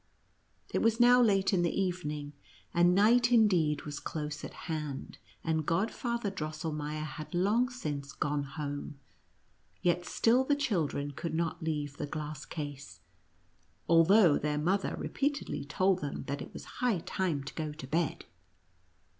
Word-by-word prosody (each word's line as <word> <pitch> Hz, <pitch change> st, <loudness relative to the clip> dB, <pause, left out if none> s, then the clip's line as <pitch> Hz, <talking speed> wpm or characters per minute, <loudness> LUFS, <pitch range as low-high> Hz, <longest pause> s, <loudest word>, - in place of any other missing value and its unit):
It -, -, +1 dB
was 225 Hz, 0 st, +2 dB
now 245 Hz, +1 st, +7 dB
late 195 Hz, -4 st, +3 dB
in 180 Hz, -, +3 dB
the 175 Hz, +2 st, 0 dB
evening, 150 Hz, -6 st, -2 dB, 0.4 s
and 175 Hz, +1 st, +4 dB
night, 220 Hz, +5 st, +6 dB
^ -, -, +5 dB
'OSS 245 Hz, -, +6 dB
incleecl, 170 Hz, -9 st, +3 dB
was 150 Hz, 0 st, -5 dB
close 150 Hz, 0 st, -5 dB
at -, -, -6 dB
hand, 150 Hz, -5 st, -4 dB, 0.2 s
and 160 Hz, -1 st, 0 dB
Godfather 215 Hz, -, -1 dB
Di 190 Hz, -5 st, -4 dB
elmeier 155 Hz, -1 st, -3 dB
had 155 Hz, +4 st, -7 dB
long 215 Hz, +8 st, +3 dB
since 145 Hz, -, -5 dB
gone 150 Hz, 0 st, -1 dB
home, 145 Hz, 0 st, -5 dB, 0.9 s
yet 175 Hz, 0 st, +2 dB
still 235 Hz, +7 st, +3 dB
the 285 Hz, +2 st, +2 dB
children 165 Hz, -, -1 dB
could 160 Hz, +3 st, -4 dB
not 165 Hz, -1 st, -1 dB
leave 145 Hz, -3 st, -2 dB
the 150 Hz, -, -3 dB
glass 150 Hz, 0 st, -5 dB
case, 145 Hz, -3 st, -7 dB, 0.9 s
although 170 Hz, +1 st, +6 dB
their 150 Hz, 0 st, -1 dB
mother 185 Hz, +6 st, 0 dB
repeatedly 285 Hz, -, -2 dB
told 185 Hz, +5 st, +2 dB
them 145 Hz, -, -4 dB
that 140 Hz, +1 st, -3 dB
it -, -, -8 dB
was -, -, -9 dB, 0.2 s
high 245 Hz, -6 st, +3 dB
time 170 Hz, -7 st, -1 dB
to 135 Hz, -, -7 dB
go 155 Hz, -2 st, -3 dB
to 150 Hz, -2 st, -8 dB
bed. 160 Hz, +3 st, -1 dB
160 Hz, 155 wpm, -31 LUFS, 150-195 Hz, 0.9 s, now